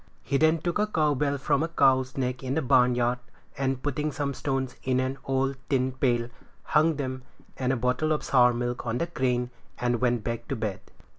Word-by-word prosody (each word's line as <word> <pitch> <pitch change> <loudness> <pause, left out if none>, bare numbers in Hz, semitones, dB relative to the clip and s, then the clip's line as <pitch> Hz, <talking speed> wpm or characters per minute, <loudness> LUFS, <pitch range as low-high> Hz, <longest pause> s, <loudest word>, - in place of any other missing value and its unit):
He 140 - 0
then 160 +2 +4
took 175 +4 -2
a 210 - +2
cow 155 -7 +2
bell 140 +1 0
from 140 +1 +1
a 165 - +1
cow's 130 -5 +2
neck 125 -1 -2
in 130 0 -2
the 160 - 0
barnyard, 125 -1 +3 0.4
and 135 -1 -1
putting 150 +2 -1
some 145 -2 -2
stones 135 -1 -2
in 130 -1 +1
an 130 +1 -2
old 135 0 0
tin 130 -2 +1
pail, 120 -2 0 0.3
hung 155 +1 +3
them 130 -2 -4 0.3
and 130 -1 0
a 130 - 0
bottle 125 +6 0
of 155 - 0
sour 125 -2 +5
milk 120 0 -3
on 115 +1 0
the 170 - 0
crane, 125 -6 -1 0.3
and 120 -1 0
went 120 -3 +1
back 115 0 -4
to 135 - -2
bed. 110 -5 -3
130 Hz, 205 wpm, -27 LUFS, 125-145 Hz, 0.4 s, sour